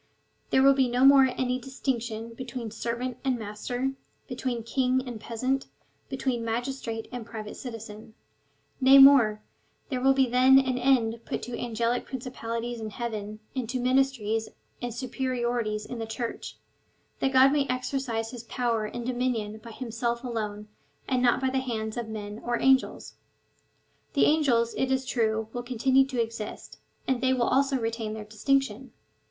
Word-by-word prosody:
There 265 - +4
will 275 0 +7
be 265 -2 +2
no 250 +2 +3
more 275 -1 +8
any 255 0 0
distinction 240 -3 -3
between 240 -2 -6
ser 235 +2 -3
vant 250 0 -4
and 260 -2 +1
master, 235 +5 -3 0.4
between 250 -2 -3
king 255 +2 +1
and 235 -3 -6
peasant, 255 +4 -2 0.4
between 260 -3 -2
magis 245 +4 -2
trate 225 -1 -5
and 245 -2 -5
private 215 -1 -7
citizen. 220 -3 -9 0.7
Nay 265 +1 +8
more, 250 -6 +7 0.5
there 255 -3 -2
will 270 +1 +4
be 265 -1 +4
then 255 +2 +6
an 260 -2 +2
end 235 -3 +2
put - - -4
to 245 - -5
angelic 235 +1 -1
principalities 240 -2 -5
in 220 - -4
heaven, 215 -1 -5
and 250 -4 -3
to 255 0 -1
ministries 250 -4 +1 0.3
and 245 -1 -3
superiorities 240 -3 -2
in 245 - -6
the 225 - -4
Church, 230 +1 -5 0.6
that 270 - +1
God 265 +1 +6
may 285 -1 +1
exercise 255 -3 -2
his 245 -2 -8
power 230 -2 -1
and 235 +2 -5
dominion 240 -4 -1
by 230 - -11
himself 235 0 -3
alone, 210 -4 -4 0.4
and 255 -1 +1
not 245 -1 +4
by 265 -1 0
the 265 - +1
hands 220 -4 -3
of 235 -2 -4
men 210 0 -6
or 240 0 -1
angels. 265 0 +2 1.0
The 280 - +4
angels, 250 -7 +3
it 265 0 0
is 265 0 +1
true, 220 -3 0
will 245 - -3
continue 260 +2 +2
to 260 -3 -3
exist, 225 -2 -4 0.3
and 260 -2 +1
they 260 0 +3
w^ill 245 -2 +1
also 275 0 +3
retain 225 -2 -3
their 215 -1 -7
distinction. 255 +2 -1
245 Hz, 165 wpm, -27 LUFS, 225-260 Hz, 1.0 s, more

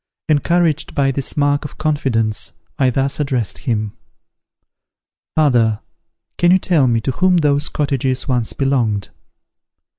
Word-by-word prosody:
Encouraged 160 +1 +1
by 135 -1 +2
this 135 +2 -4
mark 145 0 +2
of 145 - -9
confidence 130 -8 0 0.3
I 130 -2 +4
thus 135 +3 -1
addressed 130 -8 -1
him: 105 -3 -1 1.4
"Father, 120 -8 +2 0.6
can 175 - +4
you 185 - +6
tell 170 -8 +2
me 115 -2 +2
to 135 - -1
whom 180 +6 +2
those 145 -2 +1
cottages 135 -3 -1
once 125 -4 0
belonged?" 120 -7 0
135 Hz, 125 wpm, -18 LUFS, 120-150 Hz, 1.4 s, you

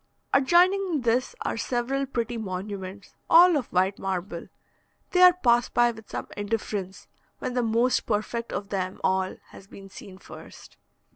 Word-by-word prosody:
Adjoining 350 +3 +3
this 245 - 0
are - - -2
several 265 +3 -2
pretty 240 -2 -3
monuments, 195 -1 -6 0.2
all 345 +1 +7
of 275 -5 -1
white 190 +2 0
marble. 185 -2 -4 0.6
They 360 - +3
are 365 0 +10
passed 240 -8 +1
by 240 0 +4
with 220 -2 -14
some - - -5
indifference 205 -2 -4 0.3
when 250 - -4
the 250 - +1
most 235 +2 +1
perfect 230 +2 -2
of 200 0 -5
them 185 -2 -3
all 190 0 0
has 195 - -14
been 195 0 -13
seen 185 0 -12
first. - - -13
225 Hz, 150 wpm, -26 LUFS, 195-255 Hz, 0.6 s, are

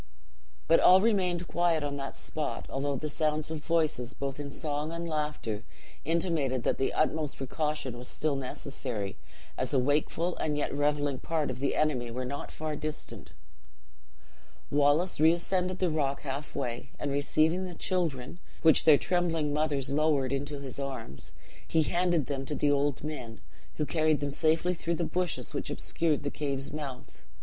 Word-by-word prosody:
But 165 - +6
all 185 +1 +8
remained 185 -5 +1
quiet 170 -3 +2
on 145 -1 -2
that 135 0 -5
spot, 155 -2 -4
although 140 +1 -1
the 155 +4 -3
sounds 155 0 0
of 155 -2 -4
voices, 155 -7 +1
both 140 0 -4
in 145 -1 -4
song 150 +1 -3
and 170 0 -4
laughter, 150 -9 -2 0.4
intimated 160 -6 +1
that - - +1
the 135 - +1
utmost 155 -1 0
precaution 150 -1 -2
was 125 - -7
still 155 -2 0
necessary, 125 -6 -4 0.4
as 130 +2 -1
a - - +5
wakeful 150 +6 +1
and 150 -1 -1
yet 150 - -1
reveling 145 -1 +1
part 160 -4 -1
of 130 - -6
the 140 0 0
enemy 130 -6 +1
were 125 +2 -3
not 140 +3 -5
far 155 -1 -4
distant. 155 0 -6 1.4
"Wallace 145 +5 +3
reascended 180 +3 +3
the 180 -3 +1
rock 140 -3 0
half 140 +1 -5
way; 120 -3 -3
and 145 - -2
receiving 155 +5 +2
the 180 -2 -7
children, 165 -5 -1 0.2
which 160 -2 +6
their 155 -2 +9
trembling 165 -4 +1
mothers 145 -3 +1
lowered 140 -3 +2
into 145 +1 -2
this 140 -1 -7
arms, 130 - -6 0.4
he 160 -1 +3
handed 175 -2 +2
them 135 0 -3
to 150 - -2
the 145 0 +2
old 145 -1 +1
men, 125 -7 -5 0.4
who 150 - 0
carried 155 +1 +2
them 145 -1 -2
safely 160 +4 +2
through 170 0 -1
the 170 - -1
bushes 180 +1 -2
which - - -3
obscured 155 -3 0
the 145 - -2
cave's 140 -2 -2
mouth. 135 - -7
150 Hz, 165 wpm, -30 LUFS, 140-160 Hz, 1.4 s, their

